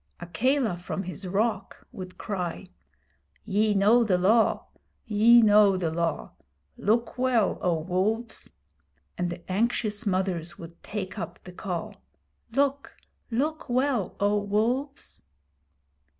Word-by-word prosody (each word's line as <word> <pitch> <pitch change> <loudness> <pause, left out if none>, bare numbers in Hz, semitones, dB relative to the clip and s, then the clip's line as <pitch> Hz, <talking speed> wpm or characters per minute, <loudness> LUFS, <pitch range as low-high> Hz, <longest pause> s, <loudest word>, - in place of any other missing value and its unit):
Akela 215 - 0
from 180 +2 -5
his 185 +2 -7
rock 215 +5 -2
would 185 -1 -9
cry: 180 -5 -4 0.7
'Ye 210 +1 +1
know 215 +5 +5
the 195 -5 +2
Law 215 +5 +3 0.4
ye 230 +1 +6
know 205 -2 +5
the 170 -3 -1
Law. 165 -1 -2 0.4
Look 230 +4 0
well, 250 -5 +2
O 175 -2 +1
Wolves!' 210 +7 -1 0.7
and 180 0 -2
the 175 0 -7
anxious 210 +1 0
mothers 185 -3 -1
would 170 0 -12
take 190 -3 -5
up 175 - -6
the 180 - -10
call: 180 -2 -5 0.5
'Look 280 0 0 0.3
look 295 +7 -2
well, 250 -5 0
O 205 +1 +2
Wolves!' 235 +8 -2
205 Hz, 120 wpm, -27 LUFS, 180-235 Hz, 0.7 s, ye